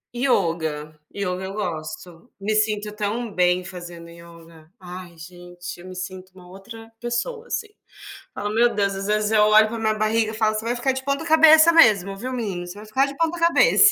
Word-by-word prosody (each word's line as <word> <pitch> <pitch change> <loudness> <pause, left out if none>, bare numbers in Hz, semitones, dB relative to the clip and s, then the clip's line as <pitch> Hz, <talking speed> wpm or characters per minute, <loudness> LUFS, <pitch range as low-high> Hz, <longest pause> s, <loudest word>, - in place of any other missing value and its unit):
Yoga, 160 - -1
yoga 185 -2 -4
eu 190 - -6
gosto. 170 0 -6
Me 205 +2 -2
sinto 215 -1 0
tão 210 +2 -3
bem 180 0 +2
fazendo 175 -2 -10
yoga. 170 -1 -16
Ai, 180 -1 -10
gente, 175 +1 -10
eu 180 - -12
me 185 - -9
sinto 185 0 -7
uma 180 -1 -15
outra 225 +5 -12
pessoa, 440 - -3
assim. 435 -3 -4 0.6
Falo 205 0 -4
Meu 235 +2 +3
Deus, 200 -1 0
às 195 0 -5
vezes, 210 0 0
eu 215 -1 +4
olho 215 +1 +6
para 230 +1 -5
minha 220 -1 +1
barriga 220 +1 +1
e - - -9
falo: 215 -1 +1
"Você 215 +1 -4
vai 240 +1 -1
ficar 250 +2 0
de 265 0 -5
ponta 280 +3 -1
cabeça 320 0 +7
mesmo, 205 - +4
viu, 255 +5 -5
menino? 195 -8 -4
Você 175 - -7
vai 210 +1 -11
ficar 260 +6 +1
de 280 - -8
ponta 330 +2 -1
cabeça". 340 +5 +5
210 Hz, 200 wpm, -22 LUFS, 180-235 Hz, 0.6 s, cabeça